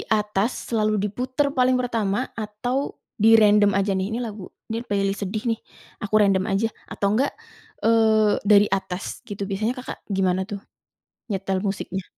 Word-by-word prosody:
atas, 210 Hz, +1 st, 0 dB
selalu 215 Hz, -1 st, +2 dB
diputer 250 Hz, +8 st, -1 dB
paling 255 Hz, 0 st, +3 dB
pertama, 230 Hz, -2 st, -1 dB
atau 235 Hz, +6 st, -3 dB, 0.2 s
dirandom 210 Hz, -2 st, +6 dB
aja 195 Hz, 0 st, +1 dB
nih? 190 Hz, +2 st, -1 dB
"Ini 225 Hz, -, -2 dB
lagu 210 Hz, -4 st, -7 dB, 0.2 s
ini 225 Hz, +1 st, -3 dB
playlist 200 Hz, -3 st, -1 dB
sedih 205 Hz, +2 st, -3 dB
nih, -, -, -18 dB, 0.4 s
aku 205 Hz, 0 st, -4 dB
random 195 Hz, -2 st, +3 dB
aja." 195 Hz, +3 st, +1 dB, 0.2 s
Atau 200 Hz, 0 st, 0 dB
enggak, 270 Hz, +6 st, +2 dB, 0.5 s
eee, 220 Hz, -2 st, +4 dB
dari 205 Hz, 0 st, +6 dB
atas, 185 Hz, -1 st, -3 dB
gitu? 200 Hz, -1 st, -4 dB
Biasanya 215 Hz, +5 st, -1 dB
Kakak 250 Hz, -, -7 dB
gimana 190 Hz, -1 st, +1 dB
tuh 205 Hz, -, -4 dB, 0.7 s
nyetel 195 Hz, -2 st, -1 dB
musiknya? 195 Hz, -1 st, -3 dB
210 Hz, 150 wpm, -23 LUFS, 195-225 Hz, 0.7 s, dirandom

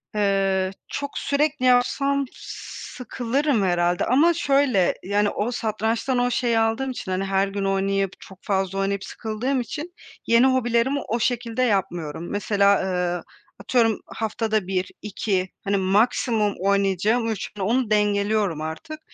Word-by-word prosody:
Eee, 195 Hz, -2 st, +1 dB, 0.2 s
çok 285 Hz, 0 st, -5 dB
sürekli 285 Hz, -1 st, 0 dB
yapsam 275 Hz, +3 st, +3 dB
sıkılırım 250 Hz, 0 st, -3 dB
herhâlde 175 Hz, -1 st, +1 dB
ama, 295 Hz, +8 st, +4 dB
şöyle, 275 Hz, -, +2 dB
yani, 205 Hz, +2 st, +1 dB
o 215 Hz, +4 st, -2 dB
satrançtan 225 Hz, +2 st, -1 dB
o 245 Hz, 0 st, +1 dB
şeyi 235 Hz, -2 st, +1 dB
aldığım 225 Hz, +4 st, 0 dB
için, 210 Hz, -6 st, -6 dB
hani, 185 Hz, +1 st, 0 dB
her 195 Hz, 0 st, +1 dB
gün 195 Hz, 0 st, -3 dB
oynayıp, 195 Hz, 0 st, 0 dB
çok 190 Hz, -1 st, -14 dB
fazla 195 Hz, -1 st, -1 dB
oynayıp 195 Hz, 0 st, -1 dB
sıkıldığım 230 Hz, +6 st, -2 dB
için 305 Hz, +9 st, -6 dB, 0.3 s
yeni 230 Hz, +2 st, +5 dB
hobilerimi 260 Hz, +1 st, +2 dB
o 235 Hz, -, -1 dB
şekilde 235 Hz, 0 st, -1 dB
yapmıyorum. 175 Hz, -7 st, -1 dB
Mesela, 200 Hz, -1 st, +3 dB
ııı, 180 Hz, -2 st, -1 dB, 0.4 s
atıyorum, 225 Hz, -4 st, +2 dB
haftada 220 Hz, -2 st, -2 dB
1-2, 190 Hz, 0 st, -2 dB
hani, 200 Hz, 0 st, +1 dB
maksimum 210 Hz, +2 st, +2 dB
oynayacağım 200 Hz, +4 st, +1 dB
3. 215 Hz, -4 st, -4 dB
Onu 225 Hz, +4 st, 0 dB
dengeliyorum 205 Hz, -4 st, +1 dB
artık. 165 Hz, -, -6 dB
215 Hz, 130 wpm, -23 LUFS, 195-245 Hz, 0.4 s, yeni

